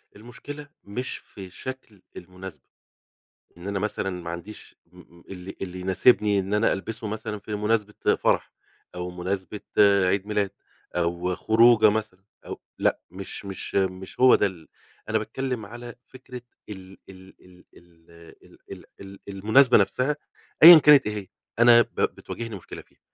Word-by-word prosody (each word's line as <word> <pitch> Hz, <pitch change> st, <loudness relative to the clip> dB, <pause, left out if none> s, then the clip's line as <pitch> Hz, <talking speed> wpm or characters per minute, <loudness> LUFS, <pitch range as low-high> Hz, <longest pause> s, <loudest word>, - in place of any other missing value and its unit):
المشكلة 125 Hz, +7 st, -10 dB, 0.2 s
مش 125 Hz, +5 st, -5 dB
في 95 Hz, -2 st, -12 dB
شكل 120 Hz, -2 st, -9 dB, 0.2 s
المناسبة. 90 Hz, -4 st, -11 dB, 1.0 s
إن 85 Hz, +3 st, -9 dB
أنا 100 Hz, -1 st, -2 dB
مثلًا 105 Hz, -1 st, -3 dB
ما 85 Hz, -, -6 dB
عنديش 85 Hz, +6 st, -9 dB
م 85 Hz, 0 st, -19 dB
اللي 95 Hz, 0 st, -9 dB
اللي 90 Hz, -1 st, -6 dB
يناسبني 100 Hz, +2 st, +3 dB
إن 95 Hz, +2 st, -4 dB
أنا 105 Hz, +2 st, +2 dB
ألبسه 110 Hz, +3 st, -6 dB
مثلًا 105 Hz, 0 st, -5 dB
في 105 Hz, +1 st, -6 dB
مناسبة 105 Hz, 0 st, -1 dB, 0.2 s
فرح، -, -, 0 dB, 0.4 s
أو 90 Hz, 0 st, -5 dB
مناسبة 95 Hz, +2 st, -5 dB, 0.2 s
عيد 100 Hz, -1 st, +3 dB
ميلاد، 105 Hz, -2 st, -1 dB, 0.4 s
أو 85 Hz, +1 st, -1 dB
خروجة 110 Hz, 0 st, +5 dB
مثلًا 105 Hz, -3 st, -4 dB, 0.2 s
أو -, -, -8 dB, 0.2 s
لأ، -, -, +1 dB
مش 95 Hz, +2 st, -8 dB
مش 95 Hz, -1 st, -7 dB
مش 95 Hz, -1 st, -2 dB
هو 130 Hz, 0 st, +7 dB
ده -, -, +2 dB
ال 90 Hz, -5 st, -6 dB, 0.4 s
أنا -, -, +1 dB
باتكلّم 125 Hz, -5 st, -4 dB
على 120 Hz, +2 st, -10 dB
فكرة 130 Hz, -1 st, -11 dB, 0.3 s
ال 95 Hz, -2 st, -11 dB
ال 95 Hz, 0 st, -14 dB
ال 90 Hz, 0 st, -20 dB
ال 85 Hz, -1 st, -24 dB, 0.3 s
ال -, -, -20 dB
ال -, -, -10 dB, 0.2 s
ال 100 Hz, 0 st, -11 dB
المناسبة 110 Hz, +7 st, +4 dB
نفسها 130 Hz, +8 st, 0 dB, 0.5 s
أيًا 170 Hz, 0 st, +13 dB
كانت 150 Hz, -3 st, +6 dB
إيه 105 Hz, -, -3 dB
هي، 100 Hz, -2 st, -7 dB, 0.3 s
أنا 120 Hz, 0 st, +7 dB
ب -, -, -2 dB
بتواجهني 115 Hz, -2 st, -4 dB
مشكلة 95 Hz, -, -10 dB
فيها، -, -, -31 dB
100 Hz, 150 wpm, -24 LUFS, 95-115 Hz, 1.0 s, أيًا